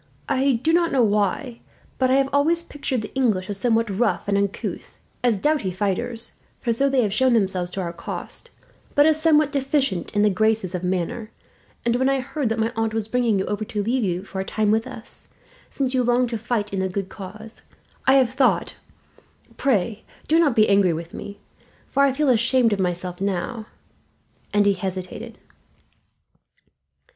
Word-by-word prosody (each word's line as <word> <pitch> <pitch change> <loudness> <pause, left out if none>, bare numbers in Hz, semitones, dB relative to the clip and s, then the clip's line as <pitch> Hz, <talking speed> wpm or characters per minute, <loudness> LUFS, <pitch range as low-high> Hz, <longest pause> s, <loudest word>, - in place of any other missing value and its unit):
I 270 +1 +2
do 255 +8 +1
not 340 0 +3
know 260 -3 +3
why, 210 +4 0 0.4
but 260 -1 +3
I 260 - +4
have 270 0 +3
always 325 +4 +3
pictured 275 -7 -3
the 215 - -8
English 210 -8 +1
as 200 - -5
somewhat 230 0 +2
rough 200 -5 0
and 200 - +1
uncouth 200 0 -3 0.3
as 240 -4 +3
doughty 295 -3 +1
fighters, 210 +5 -2 0.3
for 235 - 0
so 275 +4 +2
they 265 -2 +3
have 205 -2 -1
shown 255 +3 +3
themselves 190 -5 +1
to 195 - -2
our 170 -2 -4
cost, 170 - -7 0.5
but 290 - +6
as 315 0 +3
somewhat 305 -2 +4
deficient 270 - 0
in 205 - +3
the 210 - +4
graces 215 -1 +1
of 180 -1 -3
manner 185 +5 -2 0.6
and 235 0 +2
when 260 +1 +2
I 275 0 +2
heard 270 -1 -2
that 225 - -1
my 225 +1 0
aunt 225 -1 -1
was 220 -2 -1
bringing 235 -2 +1
you 190 - 0
over, 205 +1 -2
to 205 0 -3
leave 240 +3 0
you 180 -2 -1
for 195 -1 -5
a - - -2
time 210 +1 0
with 225 +3 +1
us, 250 -1 -8 0.4
since 265 -2 -2
you 255 - +2
longed 245 0 +2
to 230 - -1
fight 215 -3 -2
in 195 - -1
the 190 0 0
good 195 +1 -3
cause, 215 +4 -9 0.5
I 265 - +7
have 260 -3 +4
thought 260 -1 +1 0.8
pray, 220 -4 0 0.2
do 320 +2 +4
not 295 -7 +3
be 215 -1 +5
angry 200 -3 +4
with 165 +1 -6
me, 200 0 -8 0.5
for 280 - +1
I 280 -1 +5
feel 295 +1 +1
ashamed 235 -1 +3
of 200 - -2
myself 180 0 -2
now 200 +4 -2 0.4
" - - -39
and 205 0 +3
he 200 - +4
hesitated. 185 -1 -5
225 Hz, 190 wpm, -23 LUFS, 195-260 Hz, 0.8 s, I